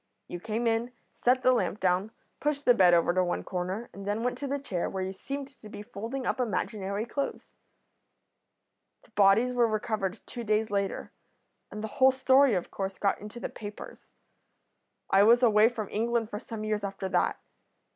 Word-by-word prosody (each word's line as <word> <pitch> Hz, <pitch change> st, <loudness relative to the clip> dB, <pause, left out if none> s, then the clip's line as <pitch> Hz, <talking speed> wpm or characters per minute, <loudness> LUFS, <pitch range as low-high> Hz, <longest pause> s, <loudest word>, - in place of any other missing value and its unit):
You 175 Hz, -, -6 dB
came 220 Hz, +4 st, -3 dB
in, 230 Hz, +2 st, 0 dB, 0.2 s
set 255 Hz, +1 st, +2 dB
the 255 Hz, -, +6 dB
lamp 230 Hz, -4 st, 0 dB
down, 185 Hz, +3 st, +1 dB, 0.3 s
pushed 290 Hz, -1 st, -1 dB
the 245 Hz, -, +7 dB
bed 185 Hz, -6 st, +6 dB
over 170 Hz, +1 st, +3 dB
to 185 Hz, 0 st, +2 dB
one 175 Hz, -, -2 dB
corner, 185 Hz, +5 st, -4 dB
and 200 Hz, -, -9 dB
then 205 Hz, +3 st, -2 dB
went 250 Hz, 0 st, 0 dB
to 285 Hz, -, -3 dB
the 280 Hz, +1 st, -1 dB
chair, 195 Hz, -11 st, -3 dB
where 190 Hz, -1 st, -3 dB
you 190 Hz, +1 st, -4 dB
seemed 275 Hz, +7 st, -6 dB
to 240 Hz, -6 st, -15 dB
be 205 Hz, -, -8 dB
folding 235 Hz, +4 st, -5 dB
up -, -, -1 dB
imaginary 210 Hz, -3 st, -2 dB
clothes.' 280 Hz, +3 st, -4 dB, 1.5 s
"The -, -, -24 dB
bodies 210 Hz, +4 st, +4 dB
were 240 Hz, -1 st, +3 dB
recovered 215 Hz, -3 st, -2 dB
two 240 Hz, -, -7 dB
days 215 Hz, 0 st, 0 dB
later, 200 Hz, -1 st, -2 dB, 0.6 s
and 210 Hz, -, -7 dB
the -, -, -2 dB
whole 265 Hz, 0 st, +8 dB
story 260 Hz, -1 st, +4 dB
of 180 Hz, -, -3 dB
course 195 Hz, -1 st, -4 dB
got 200 Hz, -1 st, 0 dB
into 210 Hz, +3 st, -8 dB
the -, -, -3 dB
papers. 205 Hz, -1 st, -10 dB, 1.0 s
I 195 Hz, -, +6 dB
was 235 Hz, +4 st, +6 dB
away 220 Hz, -1 st, +6 dB
from 225 Hz, -4 st, -5 dB
England 230 Hz, +1 st, 0 dB
for 205 Hz, -, -4 dB
some 225 Hz, -3 st, -7 dB
years 215 Hz, -1 st, -1 dB
after 195 Hz, -1 st, -4 dB
that. -, -, +1 dB
215 Hz, 185 wpm, -28 LUFS, 195-245 Hz, 1.5 s, whole